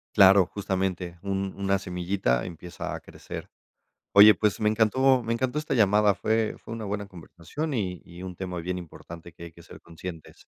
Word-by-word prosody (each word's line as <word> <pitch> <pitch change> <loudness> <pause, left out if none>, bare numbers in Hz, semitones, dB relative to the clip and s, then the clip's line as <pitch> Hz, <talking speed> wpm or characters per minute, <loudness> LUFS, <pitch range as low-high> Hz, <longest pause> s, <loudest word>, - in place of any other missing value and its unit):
Claro, 95 -2 +7
justamente, 95 -3 -3
un 95 -1 -2
una 100 0 +1
semillita 90 -8 -1
empieza 85 +1 -7
a - - -6
crecer. - - -9 0.7
Oye, 105 +1 +10
pues 105 +1 0
me 105 - +3
encantó 125 +4 +3
me 115 0 -2
encantó 130 +4 -1
esta 150 -2 -2
llamada, 105 -2 +4
fue 110 +2 0
fue 115 - -8
una 115 - -6
buena 100 0 -3
conversación 95 - -6
y 90 -6 -2
y 85 +1 -12
un 95 -1 -6
tema 90 -1 -5
bien 90 +2 -3
importante 85 0 -11
que 85 - -11
hay 85 - -10
que 85 +1 -16
ser - - -13
conscientes. 85 -1 -10
95 Hz, 180 wpm, -26 LUFS, 90-105 Hz, 0.7 s, Oye